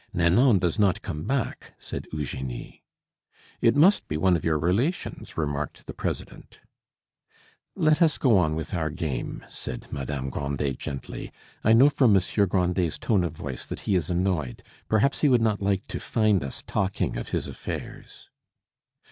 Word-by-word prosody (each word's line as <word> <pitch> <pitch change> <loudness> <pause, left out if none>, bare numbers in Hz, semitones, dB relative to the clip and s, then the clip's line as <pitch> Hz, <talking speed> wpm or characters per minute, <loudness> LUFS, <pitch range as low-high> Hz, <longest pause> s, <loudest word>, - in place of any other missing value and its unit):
"Nanon 95 +8 +5
does 90 +1 0
not 100 -4 +2
come 75 +1 -5
back," 135 -2 -2
said - - -6
Eugenie. 65 -4 -5 0.8
"It 115 - +4
must 175 +8 +5
be 75 - -2
one 90 +2 +3
of 85 - -2
your 80 -2 +2
relations," 100 - -1
remarked 75 -2 -3
the - - -7
president. - - -5 1.2
"Let 155 +2 +3
us 160 -3 +4
go 125 -6 +4
on 80 -3 +1
with 80 -1 -5
our 80 -4 0
game," 75 -5 -4
said - - -6
Madame 70 -1 -3
Grandet 70 -1 -2
gently. 70 -1 -6 0.3
"I 110 - +5
know 130 +5 +7
from 130 -6 +4
Monsieur 100 +1 +2
Grandet's 90 -2 0
tone 100 -6 +1
of 85 -3 -2
voice 65 -3 -5
that - - -6
he - - -1
is 90 -3 +1
annoyed; 90 -8 -1 0.3
perhaps 110 +6 +2
he 150 - +5
would 125 -2 +5
not 110 -3 +1
like 100 0 0
to - - -4
find 110 - +2
us 70 - -6
talking 95 0 -1
of - - -5
his - - -1
affairs." - - -8
90 Hz, 165 wpm, -26 LUFS, 75-110 Hz, 1.2 s, know